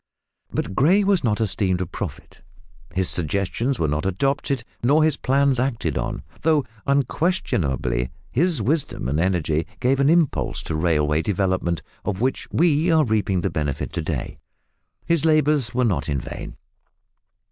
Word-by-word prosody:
But - - -3
Gray 175 - +4
was 195 -4 +2
not 110 -3 +1
esteemed 95 -4 +1
a 90 - -1
prophet. 85 - -7 0.5
His 95 -1 +1
suggestions 100 - 0
were 80 - 0
not 75 +1 -1
adopted 135 +5 -1 0.2
nor 145 +6 +4
his 155 -2 +3
plans 140 -1 +2
acted 125 -3 -1
on, - - -3 0.2
though 155 -3 +2 0.2
unquestionably 125 - 0 0.2
his 160 - +2
wisdom 145 - 0
and 70 +4 0
energy 85 -3 0
gave 130 +2 +2
an 140 +1 +4
impulse 155 - +1
to 80 - -3
railway 75 -2 +2
development, 95 -3 -1 0.2
of 100 -3 -2
which 130 +3 -1
we 165 0 +3
are 160 -2 +4
reaping 105 -5 +1
the - - -1
benefit 75 -3 -3
to - - -2
day. - - -4 0.7
His 170 -3 +1
labours 150 -5 +3
were 125 0 +2
not 85 -10 0
in 70 -2 0
vain. - - -8
115 Hz, 150 wpm, -23 LUFS, 85-145 Hz, 0.7 s, Gray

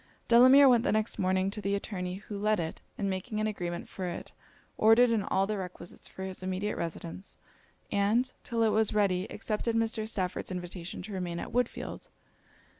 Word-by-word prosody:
Delamere 255 +4 +8
went 240 -3 +5
the - - +1
next 215 +1 0
morning 185 +1 +1
to 210 - -5
the 200 0 0
attorney 180 -3 -4
who 205 +2 -8
let 210 +1 +1
it; 160 -1 -4 0.2
and 200 - -1
making 195 +3 -3
an 215 - +1
agreement 175 -5 -3
for 185 -2 -5
it, 175 - -6 0.4
ordered 230 +2 +6
in 225 -2 +2
all 195 0 +1
the 210 0 -2
requisites 180 -1 -8
for 190 - -8
his 190 -1 -5
immediate 190 +3 -2
residence; 170 +3 -6 0.5
and, 215 +5 +2
till 230 -1 0
it 220 - +4
was 215 0 +2
ready, 195 -2 +1
accepted 220 +2 -2
Mr. 225 -1 0
Stafford's 185 -5 -2
invitation 180 0 -6
to 205 +2 -7
remain 175 -2 -3
at - - -5
Woodfield. 245 0 -2
200 Hz, 185 wpm, -30 LUFS, 185-220 Hz, 0.5 s, Delamere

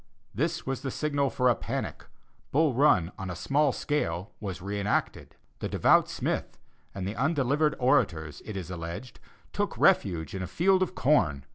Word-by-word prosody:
This - - -1
was 135 -1 -3
the 135 - -3
signal 140 0 0
for 125 0 +1
a 125 - +6
panic; - - -5 0.5
Bull 150 0 +3
Run, 110 - +3
on 95 -1 -4
a 90 - -4
small 140 - +2
scale 100 - -2
was 95 -4 -5
re 100 +2 -4
enacted. 100 +1 -2 0.2
The - - -3
devout - - +4
Smith, - - -3 0.4
and 95 -1 -3
the 100 - -4
undelivered 145 +2 +1
orators, 85 - +1
it 105 -3 -6
is 90 -1 -6
alleged, 85 +8 -7 0.3
took - - -2
refuge 80 -5 +2
in 95 - -4
a 95 - -3
field 185 - +2
of 185 - -1
corn. 80 - +2
115 Hz, 170 wpm, -28 LUFS, 90-145 Hz, 0.5 s, a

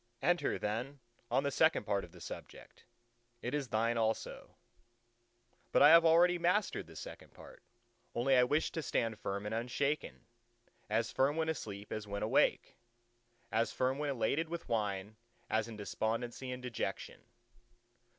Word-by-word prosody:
"Enter 175 +4 +2
then 120 +7 -3 0.3
on 135 - +2
the 140 - 0
second 160 +3 +3
part 100 -2 0
of 85 - -11
the 90 - -14
subject; - - -10 0.6
it 125 - -3
is 145 -3 -1
thine 115 +1 +1
also." 110 0 -2 1.1
"But - - +5
I - - +10
have 165 +1 +9
already 175 +2 +5
mastered 180 +4 +1
the - - -14
second - - -10
part; - - -14 0.5
only 130 +3 +3
I 125 - +6
wished 145 +5 +1
to 165 - -2
stand 115 -6 -1
firm 100 +1 -3
and 105 - -3
unshaken—as 120 -3 -3
firm 140 +3 +2
when 160 0 0
asleep 105 -9 -5
as 110 -1 -4
when 100 +1 -3
awake, 110 - +2 0.7
as 115 +1 +1
firm 130 +2 0
when 150 -1 -1
elated 140 +5 0
with 170 0 -5
wine 105 -2 -2 0.3
as 110 0 +1
in 115 -2 -8
despondency 115 +4 -3
and 125 0 -6
dejection." 125 -2 -4
120 Hz, 150 wpm, -34 LUFS, 110-145 Hz, 1.1 s, I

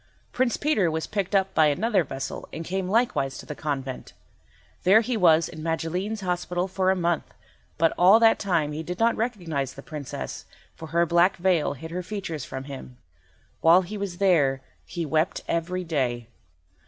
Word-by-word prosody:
Prince 250 -2 +1
Peter 250 - +2
was 160 0 -2
picked 200 -1 -2
up 195 0 +2
by 155 -1 +5
another 190 +6 +2
vessel 135 -3 -6
and 165 - -6
came 185 +1 -2
likewise 210 - +1
to - - -9
the - - -6
convent. 135 -4 -5 0.7
There 200 +5 +6
he 240 +2 -2
was 165 -5 +4
in 155 - -9
Magilene's 175 +6 -2
hospital 180 0 -1
for 185 0 0
a 190 - +3
month, 175 -3 -1 0.5
but 165 0 +3
all 190 +5 +7
that 225 -1 +5
time 170 -7 0
he 150 +2 -4
did 175 +2 -5
not 230 +2 +3
recognise 170 - -2
the 135 - -10
Princess, 150 -4 -6 0.3
for 160 - -9
her 170 +2 +2
black 175 +3 +3
veil 175 -4 +1
hid 160 +4 -9
her 180 +2 -3
features 180 -6 -5
from 130 0 -6
him. 135 -2 -9 0.6
While 170 +3 +6
he 195 +4 -7
was 200 -4 -4
there 150 -9 +3 0.3
he 170 -2 -4
wept 160 +5 0
every 180 +2 -1
day. 125 -8 -2
175 Hz, 180 wpm, -25 LUFS, 155-190 Hz, 0.7 s, all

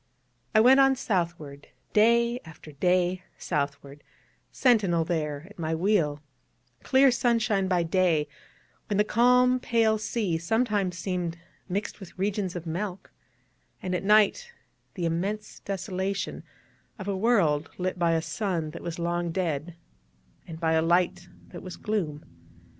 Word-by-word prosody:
I - - +7
went 260 +4 +7
on 270 0 +5
southward, 170 - -3 0.3
day 235 +3 +4
after 160 -1 -13
day 180 +4 +1 0.2
southward, 140 -2 -4 0.5
sentinel 200 -10 +2
there 155 -3 -2
at 210 -2 -16
my 160 0 -1
wheel; 160 -5 +1 0.6
clear 265 0 +4
sunshine 225 -5 +1
by 180 -2 +2
day, 165 -3 +2 0.6
when 205 - -1
the 210 - +5
calm 250 +3 +4
pale 225 -3 +2
sea 210 -6 -1
sometimes 205 -1 0
seemed 175 -1 -3 0.3
mixed 200 +4 -3
with 190 -3 -12
regions 195 -1 -1
of 175 -1 -5
milk, 180 +3 -5 0.7
and 185 - -4
at 180 - -1
night 215 - +3 0.4
the 175 -4 -2
immense 195 +6 -3
desolation 195 0 -3 0.6
of 195 -2 -7
a 200 - -1
world 190 -9 +2
lit 185 0 -2
by 170 -1 +3
a 160 -1 0
sun 175 -8 -2
that - - -9
was 170 0 -5
long 170 0 -1
dead, 165 -2 -2 0.7
and 160 -2 -8
by 165 -1 +1
a 160 0 +3
light 175 +1 +1 0.2
that 175 - -9
was 185 -1 -8
gloom. 170 -9 -3
185 Hz, 140 wpm, -27 LUFS, 165-210 Hz, 0.7 s, I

